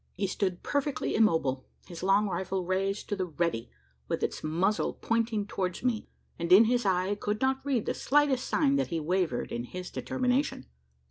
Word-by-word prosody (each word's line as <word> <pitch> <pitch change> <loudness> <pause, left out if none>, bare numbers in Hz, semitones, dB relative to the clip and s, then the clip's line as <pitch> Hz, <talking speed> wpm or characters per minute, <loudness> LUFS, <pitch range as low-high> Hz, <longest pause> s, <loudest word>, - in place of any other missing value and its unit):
He 195 - -1
stood 185 -1 -2
perfectly 285 0 -1
immobile 160 -12 +2 0.2
his 175 -3 -9
long 195 +3 +3
rifle 190 -1 -2
raised 195 +2 -1
to 205 - 0
the 185 -2 -2
"ready," 165 -8 -2 0.4
with - - -2
its - - -2
muzzle 175 +7 +1
pointing 230 -2 0
towards 185 -2 -3
me 245 -4 0 0.3
and 170 +1 -2
in 200 +5 +9
his 245 -1 +1
eye 185 0 +2
I - - +1
could 210 +1 -2
not 265 +1 +1
read 270 -6 0
the - - 0
slightest 280 -2 +2
sign 280 -3 +2
that 270 - +1
he 165 -2 -2
wavered 165 -4 -1
in 120 - -3
his 180 +8 -7
determination! 260 +2 -1
195 Hz, 185 wpm, -29 LUFS, 180-245 Hz, 0.4 s, in